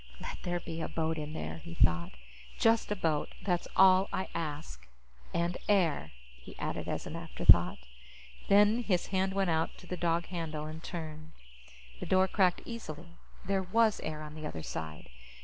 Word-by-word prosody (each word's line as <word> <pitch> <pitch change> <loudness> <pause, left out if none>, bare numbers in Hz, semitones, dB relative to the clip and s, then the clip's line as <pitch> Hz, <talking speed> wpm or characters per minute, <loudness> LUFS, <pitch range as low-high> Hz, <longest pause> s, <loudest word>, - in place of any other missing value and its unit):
Let - - -6
there 175 0 -1
be 165 -1 -6
a - - -2
boat 160 0 -1
in 150 0 -5
there, 160 - -5
he 170 +1 -9
thought. 85 - +2 0.4
Just 225 -1 +3
a - - +2
boat, 160 -6 0
that's 175 -3 0
all 190 0 +6
I 190 - -2
ask. 150 - -5 0.4
And 170 +1 -1
air, 170 - +2 0.3
he - - -12
added - - -3
as - - -3
an - - -6
afterthought. - - +4 0.7
Then 210 +4 +5
his 185 -7 +1
hand 190 +1 +1
went 195 -3 +2
out 160 0 0
to - - -13
the 180 - -4
dog 170 0 +1
handle 160 -4 -4
and 155 +1 -7
turned. 155 -2 -7 0.7
The - - -5
door 190 0 +4
cracked 185 -2 +2
easily. 175 -8 -7 0.4
There 195 0 +1
was 215 +3 +2
air 155 -1 -5
on 150 0 -8
the 155 -1 -5
other 80 - -6
side. 80 -1 -6
170 Hz, 175 wpm, -31 LUFS, 155-190 Hz, 0.7 s, all